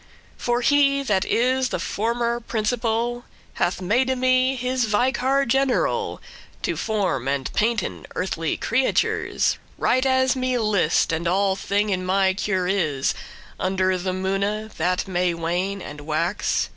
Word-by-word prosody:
For 240 0 -1
he 280 +1 +3
that 205 -6 +1
is 255 +2 +1
the - - -2
former 235 +2 -1
principal, 235 +1 -1 0.4
Hath 175 +2 +1
made 255 +7 +1
me 255 +1 +3
his 250 0 0
vicar 260 +5 +1
general 270 +1 +1 0.4
To - - 0
form 190 - -1
and 135 -1 -2
painten 220 -2 -1
earthly 165 -3 -2
creatures 255 +3 +1 0.2
Right 255 - +2
as 260 -1 +3
me 255 -1 0
list, 205 -10 +2
and 165 +1 -1
all 190 +2 +2
thing 205 +2 0
in 185 -1 -1
my 190 +1 +2
cure* 190 -2 -1
is, 160 -9 0
*care - - -11 0.4
Under 185 0 +1
the 185 +1 -2
moone, 200 +3 -2
that 180 +3 0
may 180 -2 0
wane 180 +4 -2
and 145 0 -8
wax. 160 +6 -1
210 Hz, 140 wpm, -23 LUFS, 185-250 Hz, 0.4 s, he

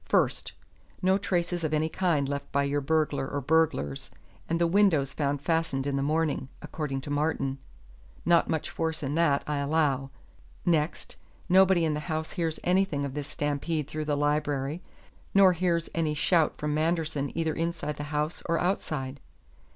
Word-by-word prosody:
First: - - +1 0.5
no 190 +1 +4
traces 175 -3 -1
of 155 -1 +1
any 155 +1 +1
kind 160 -4 +1
left 140 0 -4
by 140 0 +2
your 145 +1 0
burglar 150 -2 0
or 145 - -2
burglars, 140 - +1 0.4
and 165 +1 +1
the 170 - +3
window 170 -5 +4
found 140 +1 -2
fastened 160 -5 0
in 140 -1 -1
the 140 - 0
morning 150 -2 0
according 140 -4 -4
to 145 - -7
Martin. 145 -2 0 0.7
Not 170 -1 +4
much 160 -2 -1
force 160 -2 -2
in 140 +1 -2
that, 150 -3 +2
I 150 -1 -1
allow. 140 -2 +1 0.6
Next: 160 -2 0 0.3
nobody 185 -2 +5
in 155 - +1
the 150 - -2
house 155 0 -2
hears 165 -3 -2
anything 180 -6 +1
of 135 - -5
this 145 -1 -4
stampede 145 +1 -2
through 155 0 -4
the 145 -1 0
library, 145 +1 0 0.5
nor 195 -2 +7
hears 170 -1 0
any 160 -2 0
shout 160 +1 +2
from 150 0 -2
Manderson 155 -3 0
either 160 -1 0
inside 165 -2 -3
the 145 - -4
house 150 +2 -2
or 165 - +2
outside. 145 -7 -2
155 Hz, 165 wpm, -28 LUFS, 145-165 Hz, 0.7 s, nor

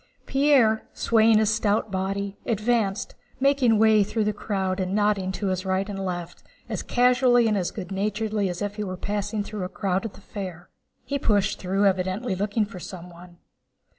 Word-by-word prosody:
Pierre, 270 -6 +3
swaying 225 -1 +4
his 215 0 +3
stout 215 -1 0
body, 195 +1 -2
advanced, 215 -3 0 0.3
making 270 -4 +3
way 215 -1 +5
through 215 +2 -1
the 210 0 0
crowd 190 -2 -2
and 185 +1 -1
nodding 205 -3 +1
to 190 -1 -1
right 190 +1 0
and 195 -2 -4
left 175 -2 -5 0.3
as - - -3
casually 245 -1 +3
and 200 -5 0
good 195 -2 -6
naturedly 210 +1 -1
as 180 +3 -4
if 205 +1 -4
he 210 - -2
were 185 -2 -5
passing 205 +2 -2
through 210 0 -6
a 180 - -4
crowd 190 -1 -1
at 225 -4 -7
a - - -15
fair. 185 -4 -7 0.4
He 280 0 -2
pushed 205 -6 +1
through, 195 +2 0
evidently 190 +4 0
looking 205 +3 0
for 200 -3 -10
someone. 175 -1 -10
205 Hz, 170 wpm, -25 LUFS, 190-220 Hz, 0.4 s, way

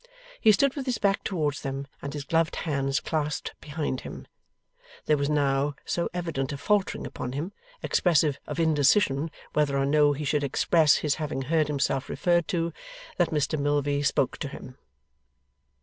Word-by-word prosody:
He 220 - +6
stood 270 +6 +2
with 275 -2 -5
his 250 - 0
back 200 -1 +1
towards 150 -6 -1
them, 135 0 -4 0.2
and 140 - -5
his 145 -2 -4
gloved 165 +2 +1
hands 140 -3 -1
clasped 155 -1 -2
behind 145 -3 -3
him. - - -8 0.8
There 155 - +4
was 140 0 -1
now 140 -1 +1
so 170 - -1
evident 165 -6 -3
a 140 - -4
faltering 205 +5 0
upon 125 - -5
him, 155 +8 -3 0.3
expressive 155 -5 +2
of - - -4
indecision 150 -1 +3 0.2
whether 145 -2 +2
or 135 - +2
no 145 +1 +4
he 150 +1 -4
should 145 +1 +1
express 150 +2 +3
his 150 - +3
having 140 -3 -2
heard 155 +2 +1
himself 140 -2 -1
referred 175 -3 +1
to, 170 -1 -1 0.4
that 175 - +2
Mr 150 0 0
Milvey 145 0 +1
spoke 140 -2 +1
to 145 - -3
him. 130 -1 -10
150 Hz, 165 wpm, -27 LUFS, 140-165 Hz, 0.8 s, He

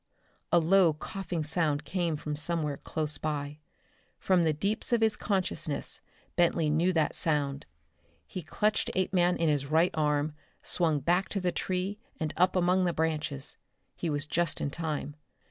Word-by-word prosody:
A - - +6
low 170 0 +5
coughing 175 +1 -4
sound 155 -2 0
came 175 -3 -1
from 150 0 -4
somewhere 155 -2 -1
close 155 0 -1
by. 150 -1 -3 0.6
From 185 -2 +3
the 160 -2 +3
deeps 200 - -1
of 235 -1 +3
his 220 -1 +3
consciousness 185 -7 -2 0.3
Bentley 165 -3 +3
knew 170 +4 +3
that 160 -3 +1
sound. 145 -3 -1 0.6
He 185 - -6
clutched 210 +7 0
Apeman 180 -1 +2
in 165 - +1
his 145 -2 +1
right 160 +4 +3
arm, 150 -1 +1 0.3
swung 160 -5 +1
back 180 +6 +1
to 200 - -1
the 180 -1 0
tree 190 +4 -2 0.2
and 155 -1 -2
up 180 +2 +3
among 180 +1 +3
the 175 - +1
branches. 155 -4 -2 0.4
He 170 - -3
was 145 -1 -1
just 170 +1 0
in 140 - -2
time. 150 -2 -3
165 Hz, 160 wpm, -29 LUFS, 150-180 Hz, 0.6 s, A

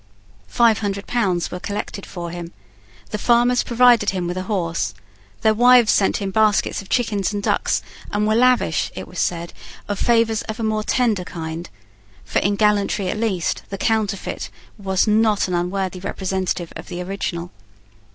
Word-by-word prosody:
Five 225 - +3
hundred 200 -1 -3
pounds 185 -8 0
were 180 - -5
collected 200 0 -5
for 170 -2 -6
him. 175 -1 -7 0.6
The 210 - -3
farmers 240 +2 +3
provided 240 -3 +4
him 185 -2 -2
with 175 +1 -3
a 185 - -2
horse. 170 - -1 0.5
Their 220 -1 +4
wives 245 0 +6
sent 195 - +2
him 195 -2 -3
baskets 215 0 +2
of 195 - -15
chickens 215 -6 0
and 205 -1 -3
ducks, - - +1 0.3
and 210 0 0
were 215 - +2
lavish, 250 +2 +2
it - - -6
was - - -7
said, 170 -1 -1 0.3
of 205 -1 -3
favours 230 -2 +2
of 220 - -4
a - - -2
more 215 -1 0
tender 225 -6 +1
kind; 165 0 -6 0.6
for - - 0
in 200 +1 +1
gallantry 205 -2 +1
at 215 - -2
least, 195 -7 -1
the 195 - -5
counterfeit 215 -2 -1 0.3
was 190 -2 0
a 215 - +1
not 215 -2 +3
unworthy 185 +1 -2
representative 185 -2 -3
of - - -8
the 175 - -6
original. 180 -2 -4
200 Hz, 170 wpm, -21 LUFS, 180-220 Hz, 0.6 s, wives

